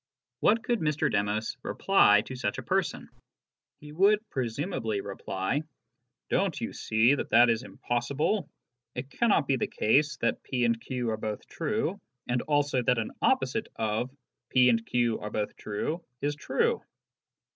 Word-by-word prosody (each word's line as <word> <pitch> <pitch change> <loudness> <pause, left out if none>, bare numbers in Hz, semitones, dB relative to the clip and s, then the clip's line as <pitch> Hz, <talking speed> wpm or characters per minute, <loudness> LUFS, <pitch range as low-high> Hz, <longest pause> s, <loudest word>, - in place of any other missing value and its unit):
What 225 +3 +3
could 240 -2 0
Mr. 150 -1 +1
Demos 105 +2 -1
reply 105 - +4
to 130 +4 -8
such 105 -5 -2
a - - -5
person? - - -1 0.7
He 150 0 -10
would 205 +6 +3
presumably 120 - -2
reply; 95 +5 -2 0.3
" - - -55
Don't - - +1
you - - -4
see 110 +4 +3
that 145 - -2
that 120 0 +6
is 115 0 0
impossible? 140 - -1 0.5
It 130 +3 -5
cannot 215 -10 +2
be 135 - +2
the - - -1
case 145 +7 +2
that 115 - 0
p 125 -2 -1
and 115 -1 +1
q 125 -3 -2
are 110 - -2
both 105 -1 -4
true, 205 +1 -2 0.3
and 120 0 0
also 145 -3 +1
that 125 0 +2
an 115 - -2
opposite - - +1
of 110 +3 -1 0.4
'p 125 -1 +5
and 115 -1 +2
q 120 -1 0
are 105 - -5
both 105 0 -3
true 155 +11 -3
' 125 - -50
is 145 +1 +1
true." 465 - 0
125 Hz, 165 wpm, -28 LUFS, 110-150 Hz, 0.7 s, that